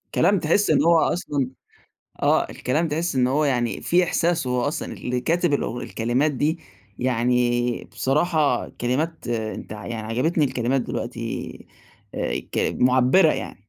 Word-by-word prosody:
كلام 200 -2 +3
تحس 170 +7 +2
إن - - +4
هو 170 -1 +5
أصلًا 145 -7 0 0.7
آه، - - +2
الكلام 155 +7 -1
تحس 160 0 -2
إنه 125 0 +2
هو 150 +2 +2
يعني 120 -4 0
في 180 +1 +3
إحساس، 170 -4 0
هو 125 0 0
أصلًا 145 +6 -3
اللي 125 0 -3
كاتب 170 0 +1
الأغ 120 -4 -1
الكلمات 125 +7 0
دي 150 +5 -1 0.4
يعني 120 0 +1
بصراحة 150 -1 +1
كلمات، 150 +7 -2
أنت 110 -3 -4
يعني 110 +2 -6
عجبِتني 150 +7 +1
الكلمات 130 0 0
دلوقتي، 115 -1 -4 0.6
آآ - - -1
ك - - 0
معبِّرة 130 +7 +4
يعني. 95 - -7
130 Hz, 140 wpm, -23 LUFS, 120-160 Hz, 0.7 s, هو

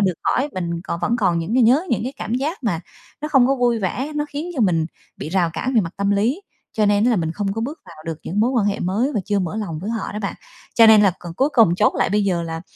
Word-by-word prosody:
được 190 -2 +2
khỏi, 275 - +1
mình 170 -2 -3
còn 170 - -4
vẫn 235 - +1
còn 185 -7 +1
những 165 +7 -2
cái 255 - +4
nhớ 255 +9 +4
những 235 - +1
cái 255 +3 -4
cảm 225 - -3
giác 280 +4 -3
mà 175 -8 0 0.4
nó 300 - -3
không 270 -5 +5
có 270 - +2
vui 240 -2 +2
vẻ, 250 +9 -3
nó 295 - 0
khiến 305 +5 -5
cho 270 - -2
mình 165 -5 +2 0.3
bị - - -6
rào 175 -1 +1
cản 260 +9 -3
về 225 - +5
mặt 170 -3 -4
tâm 200 0 0
lý, 225 - +1 0.3
cho 215 -1 +1
nên 205 +1 +3
á 245 - +4
là 235 - +2
mình 165 -3 -1
không 195 +1 -2
có 225 - -4
bước 280 +8 -5
vào 170 -2 -14
được 165 -2 -4
những 200 +4 -1
mối 235 +3 +3
quan 235 -6 +1
hệ 205 - -1
mới 215 +11 0
và 210 - +1
chưa 205 -1 0
mở 185 +1 -3
lòng 195 -8 -4
với 195 +7 -4
họ 230 -1 -3
đó 210 - -4
bạn. 195 - -3 0.4
Cho 230 - +7
nên 220 -1 +7
là 195 -3 +4
còn 170 -1 -9
cuối 270 +9 +2
cùng 220 -9 +5
chốt - - +2
lại - - +1
bây 205 +1 +2
giờ 180 -3 0
là 165 -1 -5
210 Hz, 300 wpm, -21 LUFS, 180-245 Hz, 0.4 s, Cho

